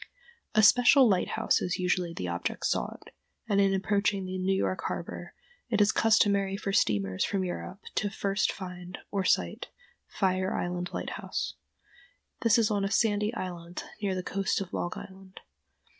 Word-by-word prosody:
A 215 - +5
special 245 +4 +7
lighthouse 190 -4 +1
is 180 - -1
usually 180 -1 0
the 130 - -5
object 85 0 -3
sought, - - -2 0.4
and 200 -1 +3
in 195 -1 +3
approaching 195 0 +1
New 185 +1 -1
York 190 -1 0
harbor - - -6 0.3
it 215 -3 +1
is 205 0 +5
customary 200 -3 +3
for 200 -1 -3
steamers 95 - +1
from 195 -2 0
Europe 180 +2 -5
to 205 - +1
first 200 0 0
find, 180 -1 -8
or 200 -2 0
sight, - - +1 0.4
Fire 185 -1 0
Island 180 +1 -2
Lighthouse. - - -4 0.9
This 230 -1 +4
is 225 -2 +2
on 200 -1 +1
a 195 - 0
sandy 210 -1 +2
island 175 -3 -6 0.2
near 195 -2 0
the 185 - -3
coast 195 +1 -1
of 195 -2 -6
Long 175 - -2
Island. 190 0 -11
195 Hz, 155 wpm, -29 LUFS, 180-205 Hz, 0.9 s, special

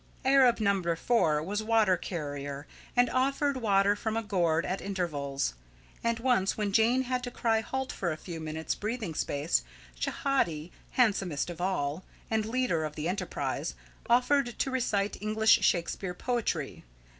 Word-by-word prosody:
Arab 260 -3 +5
number 195 -5 +1
four 160 -7 +2
was 205 +5 -2
water 220 -4 +3
carrier, 145 -5 -5 0.3
and 245 0 +5
offered 275 +2 +1
water 200 -3 +3
from 220 +1 -2
a 225 - -1
gourd 170 -5 +1
at 185 +2 -2
intervals; 145 - -2 0.5
and 230 0 +1
once, 235 -5 +1
when 210 -2 -1
Jane 235 +4 +4
had 255 0 -1
to 245 - -4
cry 225 -2 +1
halt 265 +3 -3
for 175 -3 -2
a 155 - -4
few 170 0 -7
minutes' 160 0 -3
breathing 215 -4 -3
space, 150 +2 0 0.3
Schehati, 175 - -1 0.2
handsomest 195 - +1
of 175 0 -8
all, 175 -3 -1 0.3
and 220 -1 +1
leader 235 -9 0
of 150 -1 -4
the 155 +1 -3
enterprise, 185 +4 -2 0.3
offered 245 +1 +3
to 270 - 0
recite 210 -7 0
English 215 +1 +4
Shakespeare 180 +1 0
poetry. 240 +3 -2
205 Hz, 150 wpm, -29 LUFS, 170-240 Hz, 0.5 s, Arab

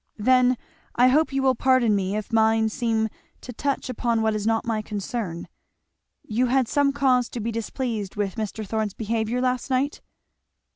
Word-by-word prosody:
"Then 255 +3 +4 0.4
I 250 +1 +5
hope 305 +4 +3
you 270 0 0
will 260 -1 +4
pardon 255 -3 +3
me 195 0 -1
if 215 +2 -5
mine 220 0 +3
seem 225 -2 0 0.3
to 250 - -8
touch 280 +3 -2
upon 235 -2 0
what 220 0 +2
is 210 0 -2
not 225 0 +1
my 225 -2 -1
concern. 205 -4 -4 0.8
You 240 +4 0
had 260 0 +2
some 285 +2 +2
cause 260 -3 +2
to 240 - -6
be 230 +1 -2
displeased 225 -2 -3
with 205 -2 -1
Mr. 215 -1 -4
Thorn's 215 -1 -2
behaviour 225 +2 -1
last 255 +1 -1
night?" 270 +3 0
230 Hz, 175 wpm, -24 LUFS, 215-255 Hz, 0.8 s, I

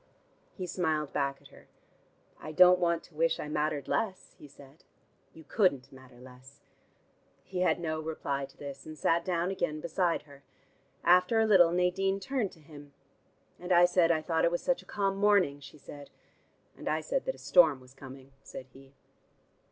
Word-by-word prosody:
He 185 - -5
smiled 160 -4 -2
back 140 -1 -1
at - - -16
her. - - -18 0.7
"I 155 - -8
don't 180 +1 +6
want 170 -1 0
to - - -19
wish 165 +2 0
I - - -5
mattered 150 -2 -2
less," 195 -4 -3
he 150 - -12
said. 140 +1 -18 0.5
"You 160 - -15
couldn't 150 - 0
matter 130 -2 -16
less." 130 +2 -16 0.8
He 185 - -6
had 180 - +2
no 155 -2 -3
reply 140 -3 -3
to - - -23
this, 140 0 -9
and 155 0 -9
sat 165 +4 +1
down 180 0 -1
again 175 -5 -2
beside 170 +2 -1
her. 140 -2 -17 0.6
After 180 +5 +4
a 220 - +3
little 185 -6 +5
Nadine 185 +2 0
turned 225 0 -2
to - - -18
him. 145 -2 -15 0.6
"And 180 +1 -7
I 175 0 +6
said 175 -1 +3
I 160 -2 +1
thought 165 0 0
it - - +4
was 175 0 -3
such 265 - 0
a - - -21
calm 195 -1 -1
morning," 200 -8 +2
she 145 +2 -13
said. 145 0 -12 0.7
"And - - -6
I - - 0
said - - -2
that - - -4
storm 160 -7 +4
was 130 0 -18
coming," 135 0 -13
said 130 - -10
he. 135 +1 -17
160 Hz, 185 wpm, -29 LUFS, 140-180 Hz, 0.8 s, don't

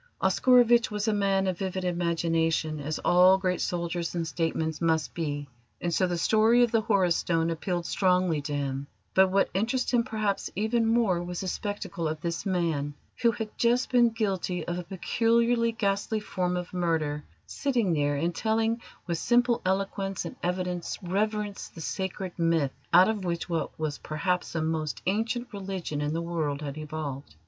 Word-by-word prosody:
Oscarovitch 240 -2 +4
was 210 0 -2
a 220 - +3
man 195 -1 +2
of 185 -2 -1
vivid 190 -1 -2
imagination, 165 -2 0
as 150 +2 -3
all 180 +2 +6
great 185 -2 -1
soldiers 170 0 -2
and 165 -1 -1
statesmen 160 -1 -1
must 160 -2 +1
be, 145 -3 -3 0.3
and 175 -1 -2
so 185 +2 +2
the 175 -1 -1
story 225 +6 +4
of 240 - +1
the 225 - +3
Horus 195 -6 +2
Stone 165 -1 +1
appealed 175 +1 -2
strongly 180 -5 +2
to 145 +1 -4
him; 140 -1 -3 0.3
but 190 0 +6
what 195 +1 +2
interested 240 +6 0
him 235 - +3
perhaps 215 -3 -2
even 225 +3 +1
more 225 -6 +2
was 175 0 -4
the 190 - -4
spectacle 200 -3 -3
of 155 0 -3
this 170 +4 -3
man, 160 -6 -1 0.3
who 235 - +5
had 220 -1 -4
just 240 +2 +2
been 240 -2 +5
guilty 190 -6 -2
of 175 +1 -2
a - - -5
peculiarly 230 +5 +1
ghastly 210 0 -1
form 180 -3 -2
of 180 0 -5
murder, 160 -4 0 0.2
sitting 240 -10 0
there 145 -2 +1
and 165 +5 0
telling 225 +3 0 0.2
with 170 -2 -2
simple 240 0 +3
eloquence 195 0 -1
and 170 - -6
evident 180 -1 -2
reverence 205 +2 -1
the - - -13
sacred 190 +2 -4
Myth 165 -5 +2 0.2
out 185 - +7
of 215 -3 -1
which 170 -2 -2
what 165 -2 -3
was 155 -2 -3
perhaps 180 +4 -2
the 165 -1 -1
most 155 -7 -2
ancient 225 +5 -1
religion 190 -7 -4
in 150 +1 -1
the 165 +1 -2
world 155 -4 -2
had 140 -1 -4
evolved. 150 -3 -6
180 Hz, 175 wpm, -28 LUFS, 165-210 Hz, 0.3 s, out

